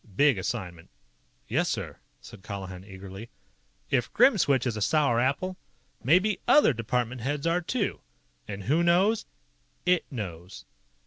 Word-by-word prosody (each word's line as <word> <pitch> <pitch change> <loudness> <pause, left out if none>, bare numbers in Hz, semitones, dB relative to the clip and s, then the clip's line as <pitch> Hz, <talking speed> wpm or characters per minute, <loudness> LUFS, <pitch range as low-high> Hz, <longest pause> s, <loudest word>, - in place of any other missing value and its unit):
Big 145 +2 +5
assignment." 90 -5 -5 0.6
"Yes, - - +1
sir!" - - -4 0.2
said - - -13
Colihan 95 -2 -7
eagerly. 95 +2 -10 0.6
"If 125 -3 +1
Grimswitch 170 - +4
is 120 -3 -1
a 105 - -4
sour 140 -1 +2
apple, 160 +9 0 0.5
maybe 185 - +3
other 295 - +6
department 120 +1 -2
heads 145 +4 -2
are, 170 +2 +2
too. 205 +4 -2 0.5
And 100 -1 -6
who 150 - +2
knows? 185 +6 +3 0.6
IT 180 -1 +1
knows." 90 - -7
125 Hz, 130 wpm, -27 LUFS, -, 0.6 s, other